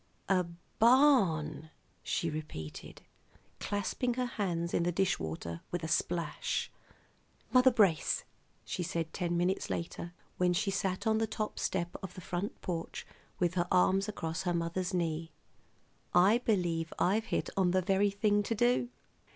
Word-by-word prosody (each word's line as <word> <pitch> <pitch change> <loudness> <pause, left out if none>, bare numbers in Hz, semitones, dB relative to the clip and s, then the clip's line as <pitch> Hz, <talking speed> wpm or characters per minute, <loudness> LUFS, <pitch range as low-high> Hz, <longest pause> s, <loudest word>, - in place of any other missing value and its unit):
A 185 -2 +3 0.3
barn!" 200 - +4 0.3
she 170 - -1
repeated, 150 - -7 0.6
clasping 210 +5 -1
her 250 0 0
hands 175 -7 -2
in - - +2
the 175 +1 +1
dish 190 +2 +1
water 80 +1 -5
with 175 -2 -3
a - - -2
splash. 170 +1 -1 0.8
"Mother 255 0 +7
Brace," 200 -10 +3 0.4
she - - -3
said 165 -2 -2
ten 175 -2 -1
minutes 180 +2 0
later, 170 +1 -4 0.2
when 180 -1 +3
she 195 +3 0
sat 190 -1 -1
on 220 0 +3
the 225 - +1
top 215 0 -3
step 175 -1 -2
of 190 -2 -7
the - - -7
front 180 +4 -4
porch 165 -2 -4 0.3
with 175 -1 +1
her 175 -1 0
arms 195 +3 +3
across 165 -3 -3
her 175 -2 0
mother's 170 +3 -1
knee. 165 -2 -2 0.8
"I 195 +6 +6
believe 175 -8 0
I've 210 +5 +2
hit - - -2
on 190 -2 +3
the 185 +1 +2
very 195 +2 +3
thing 205 +1 +2
to 225 +3 -2
do. 240 +2 +2
180 Hz, 150 wpm, -32 LUFS, 170-205 Hz, 0.8 s, Mother